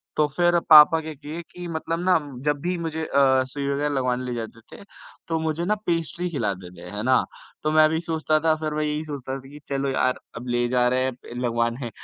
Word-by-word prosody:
तो 150 - +3
फिर 175 -1 +3
पापा 155 +1 +9
क्या 160 0 -5
किए 150 +4 -7
कि 175 0 -7
मतलब 165 0 -3
ना 180 0 +4 0.3
जब 150 -1 +1
भी 180 +1 -1
मुझे 160 -1 -3
अ, 130 -2 +3
सुई 140 +2 -5
वग़ैरह 145 +1 0
लगवाने 125 -1 0
ले 125 - -3
जाते 115 -1 -6 0.2
थे, - - -12 0.4
तो 165 -1 0
मुझे 160 +2 -2
ना 210 - +2
पेस्ट्री 170 +1 -1
खिलाते 100 - -3
थे, 90 +1 -10
है 105 - -3
ना? 130 0 +4 0.4
तो 155 - +1
मैं 155 0 +6
भी 160 +1 0
सोचता 155 -2 0
था 160 +1 +3
फिर 155 -1 -3
मैं 155 0 -1
यही 150 +1 -1
सोचता 140 -4 -5
था 135 0 -10
कि 145 +1 -11
चलो 140 0 -1
यार 130 -1 +1 0.2
अब 125 +2 -7
ले 120 0 +1
जा 125 -1 +3
रहे 130 +1 +1
हैं 125 -2 -6
लगवाने। 120 +1 -1
150 Hz, 225 wpm, -24 LUFS, 125-160 Hz, 0.4 s, पापा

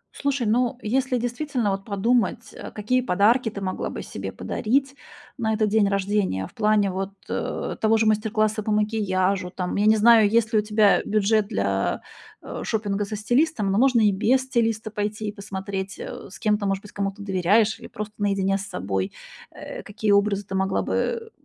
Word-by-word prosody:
Слушай, 280 -3 -1
ну, 245 +3 +1
если 255 +3 0
действительно 245 -2 -1
вот 195 0 -4
подумать, 225 +1 0
э, - - -8
какие 235 +5 0
подарки 225 +2 +3
ты 200 -1 -7
могла 185 -1 -3
бы - - -6
себе - - -6
подарить 270 +4 -1 0.5
на 220 -2 0
этот 215 -1 +1
день 210 -1 +3
рождения, 195 - 0
в - - -14
плане 210 -2 +2
вот, 195 +1 -4 0.2
э, - - -3
того 220 0 +4
же 220 - +2
мастер-класса 215 0 +1
по 215 - -2
макияжу, 200 -3 0
там, 180 -1 -4
я 210 +1 +2
не 220 - +6
знаю, 220 -1 +6
есть 225 0 +2
ли 215 - +5
у - - +2
тебя 210 -1 +3
бюджет 215 0 +2
для, 100 0 -1 0.4
э, - - -6
шопинга 205 -2 -1
со 215 +2 -5
стилистом. 235 -1 +1
Но 200 - +2
можно 255 -2 +4
и 210 -2 +5
без 235 +7 +2
стилиста 230 -4 -1
пойти 210 0 -3
и - - -4
посмотреть, 195 -1 -5
э, - - -8
с 190 - -11
кем 210 -1 +1
ты, 200 - -2
может 195 0 -1
быть, 205 - -12
кому-то 200 0 -4
доверяешь 205 +3 +2
или - - -10
просто 210 0 -7
наедине 195 -1 +1
с 195 - -6
собой, 95 - -3 0.4
э, - - -8
какие 205 0 -2
образы 200 0 +2
ты 195 - -8
могла 190 0 0
бы 455 -1 -2
210 Hz, 190 wpm, -24 LUFS, 195-225 Hz, 0.5 s, не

